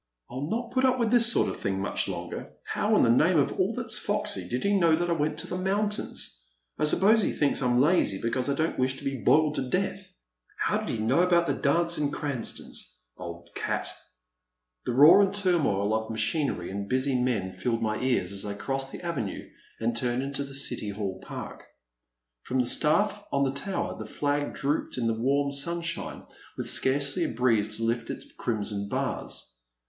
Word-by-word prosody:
I - - -10
*11 140 +4 -4
not 235 +2 -3
put 260 +1 +1
up 260 -1 +3
with 230 -3 0
this 240 -1 +6
sort - - +3
of - - -4
thing 95 -2 -2
much 95 - 0
longer - - -5
— - - -6
^how - - +2
in - - +5
the 115 - +5
name 175 0 +3
of 145 - +2
all 190 +5 +1
that 240 -3 -4
's 215 - +1
foxy 210 0 -1
did 125 +1 -2
he 200 0 +2
know 170 -4 +4
that 175 +1 -1
I - - +4
went 155 -2 -1
to - - -3
the 180 - -4
moun 200 +3 +1
tains? 135 - -3 0.4
I - - +2
suppose 210 +8 +4
he - - +1
thinks 145 -2 +1
I 125 - +1
'm 120 0 +3
lazy 145 - +3
because 125 +3 -1
I 140 - +1
don't 160 0 -1
wish 130 +1 0
to - - -12
be 135 0 -2
boiled 155 -1 +4
to 130 - -2
death. 190 +2 -2 0.5
How - - 0
did - - -5
he - - -2
know 115 +8 +1
about 175 -1 +3
the - - 0
dance 170 +4 +1
at 145 -1 0
Cranston's? 140 -5 -4 0.2
Old 85 0 -9
cat! - - -2 0.5
*' - - -54
The - - +1
roar 150 +10 +8
and 195 0 +1
turmoil 155 - +2
of 110 0 -1
machinery 110 - -1
and 100 0 -5
busy 130 +2 +1
men 110 -7 0
filled 115 +5 -2
my 110 -1 -1
ears 120 -8 +1
as 100 -1 -1
I 100 -1 -4
crossed 135 +5 -3
the - - -8
avenue 135 - -4 0.3
and 115 +1 -1
turned 120 +2 -1
into 140 0 -3
the 140 -1 -7
City 125 -6 -1
Hall 100 -2 -4
Park. - - -8 0.8
From 130 - -3
the 125 - +2
staflF 205 +11 +3
on 140 - +2
the 135 - +1
tower 190 +7 -3
the - - -6
flag 145 0 -1
drooped 145 0 -2
in 120 - -1
the 115 - +2
warm 140 +5 +1
sunshine 170 +4 -2 0.3
with - - -3
scarcely 140 +1 +3
a - - -1
breeze 110 -3 +1
to 115 - -4
lift 115 +1 -1
its - - -5
crimson 105 -3 -2
bars. - - -3
140 Hz, 215 wpm, -27 LUFS, 115-170 Hz, 0.8 s, roar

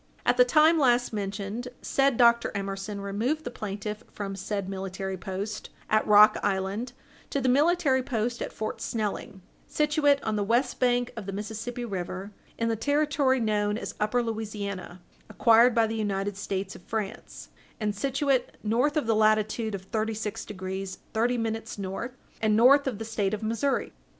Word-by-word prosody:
At - - +4
the - - +8
time 320 -3 +5
last 245 -4 +3
mentioned, 205 +3 -4 0.2
said 275 -3 +2
Dr. 235 -1 +4
Emerson 195 +1 -4
removed 225 +11 -1
the 245 - -5
plaintiff 210 +1 -5
from 195 -1 -5
said 195 0 -3
military 190 0 -4
post 190 +4 -5 0.2
at 215 0 +3
Rock 210 +1 +7
Island 200 +5 -1 0.4
to 280 - -1
the 260 - 0
military 285 0 +3
post 240 -1 -2
at - - -3
Fort 215 - -5
Snelling, 210 -3 -3 0.2
situate 300 -1 +3
on 220 -1 -1
the 205 - +1
west 235 +6 +1
bank 245 -1 +2
of 215 -4 -7
the - - -2
Mississippi 220 +4 -5
river, 190 -1 -5 0.3
in 230 - 0
the 225 - +1
Territory 285 +2 +2
known 210 -2 +1
as - - -5
Upper 225 +4 +1
Louisiana, 205 -5 -5 0.3
acquired 230 +1 +5
by 230 -1 +4
the 225 0 -3
United 200 -2 -1
States 195 -1 -4
of - - -12
France, 210 +1 -5 0.3
and 210 -2 -1
situate 275 +3 0
north 245 +8 +1
of 300 - +1
the 225 - +2
latitude 215 0 +2
of 190 - -7
thirty 220 +2 -2
six 210 -1 -4
degrees 190 -1 -5 0.2
thirty 240 +2 +1
minutes 225 -1 -3
north, 205 +6 -5 0.2
and 215 -1 +3
north 275 +5 +6
of 245 -6 -2
the 225 - -5
State 215 -2 -1
of 215 - -9
Missouri. 230 +6 -1
220 Hz, 170 wpm, -27 LUFS, 200-245 Hz, 0.4 s, the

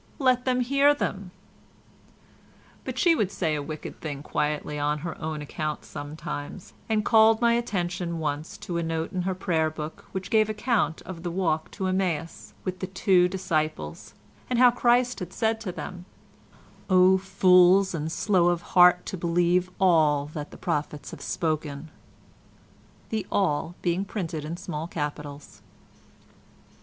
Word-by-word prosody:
Let 255 -2 +2
them 255 -1 +2
hear 280 +3 +4
them." 195 -9 -3 1.6
But - - -5
she 345 -4 +5
would 210 - 0
say 160 -4 -1
a 150 - -1
wicked 155 +2 -7
thing 145 -3 -5
quietly 150 0 -2
on 150 +1 0
her 165 - -4
own 155 -1 -3
account 155 +1 -4
sometimes, 145 +3 -7 0.2
and 215 -1 +1
called 220 0 +5
my 235 -1 +4
attention 180 -7 -2
once 150 0 -3
to 175 -4 -2
a - - -1
note 165 0 -3
in 185 - -1
her 190 +1 -1
prayer 165 -4 0
book 155 0 -7
which 190 0 -5
gave 215 -1 +4
account 215 -5 0
of 175 -3 -8
the 175 - -3
walk 170 -2 -1
to 195 - -3
Emmaus 180 -4 -2
with 185 0 -4
the 185 - -3
two 185 -1 +3
disciples, 155 - -3 0.3
and 250 - 0
how 250 0 +7
Christ 245 +1 +2
had 180 -1 -6
said 225 +2 0
to 200 -5 -4
them 180 0 -7 0.8
"O 185 0 +5
fools 190 0 +5
and 160 -1 -3
slow 185 -1 +2
of 175 -1 +1
heart 180 0 +6
to 190 - -5
believe 175 +1 +1
ALL 155 -6 +4
that 150 -2 -5
the - - -12
prophets 150 -4 -3
have - - -10
spoken"—the 155 +6 -6
"all" 170 -3 0
being 180 +2 0
printed 165 -7 -4
in 165 +3 -5
small 170 -4 -5
capitals. 145 -8 -6
175 Hz, 150 wpm, -26 LUFS, 155-195 Hz, 1.6 s, how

